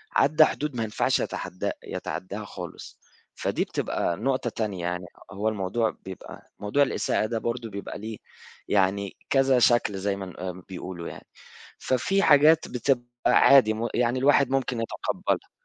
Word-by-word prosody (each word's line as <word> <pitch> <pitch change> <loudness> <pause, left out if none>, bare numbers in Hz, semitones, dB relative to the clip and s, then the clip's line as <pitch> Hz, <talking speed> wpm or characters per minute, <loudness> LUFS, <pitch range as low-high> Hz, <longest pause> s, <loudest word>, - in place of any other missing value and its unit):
عدّى 155 +2 +6
حدود 150 -3 -3
ما 115 - -1
ينفعش 110 -1 +1
يتحدا 90 - -3
يتعداها 100 +3 -5
خالص، - - -9 0.4
فدي - - -1
بتبقى 85 - -2
نقطة 130 0 0
تانية 105 -5 -3
يعني 90 +1 -2 0.3
هو 105 +3 -1
الموضوع 110 +2 0 0.2
بيبقى 95 -1 -10
موضوع 105 +8 +2
الإساءة 130 - 0
ده 115 +1 -2
برضه 115 0 -3
بيبقى 100 -1 -6
ليه 110 +1 -6 0.5
يعني 100 0 +1
كذا 135 -2 +4
شكل 120 -4 +3
زيّ 100 +1 -1
ما 100 -1 -6
ن 90 - -9
آآ 90 0 -4
ما 90 0 -12
بيقولوا 90 -2 -6
يعني، - - -10 0.5
ففي 190 +11 +1
حاجات 155 +1 +6
بتبقى 125 0 0 0.2
عادي 130 -6 +6
م 115 +2 -2
يعني 120 +1 +1
الواحد 140 0 +4
ممكن 130 -3 -1
يتقبلها. 115 - -2
110 Hz, 155 wpm, -26 LUFS, 100-130 Hz, 0.5 s, عدّى